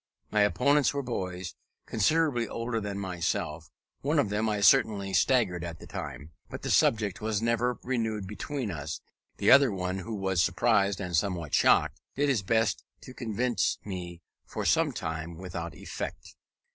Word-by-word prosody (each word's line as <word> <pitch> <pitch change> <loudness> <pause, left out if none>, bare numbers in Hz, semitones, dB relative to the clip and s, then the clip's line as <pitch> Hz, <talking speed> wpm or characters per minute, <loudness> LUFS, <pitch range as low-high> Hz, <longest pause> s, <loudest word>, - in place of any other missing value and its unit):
My 105 - +3
opponents 140 - +3
were 140 - -1
boys, 90 -7 -4 0.3
considerably 130 0 +2
older 115 +1 -3
than 100 -1 -4
myself: 85 -4 -3 0.3
one 150 +3 0
of 125 -8 +2
them 105 +2 0
I 105 -1 -1
certainly 100 -1 +4
staggered 95 -3 +2
at 85 -2 -6
the - - -11
time, 75 +3 -7 0.2
but - - -8
the - - -1
subject 105 -2 +2
was 110 -1 0
never 115 +2 +1
renewed 110 -5 -1
between 110 +4 -4
us: 80 0 -5 0.4
the - - +3
other 140 0 +8
who 95 +2 -3
was 95 -3 +1
surprised 100 +1 +2
and 90 -3 -3
somewhat 85 -3 -1
shocked, - - +3
did 145 +1 +1
his 125 -7 +2
best 110 +4 +1 0.2
to 130 - -11
convince 120 0 0
me 90 -3 -6 0.2
for - - -5
some - - +3
time, 80 +1 -5
without 85 -2 -6
effect. - - -7
100 Hz, 160 wpm, -29 LUFS, 90-115 Hz, 0.4 s, other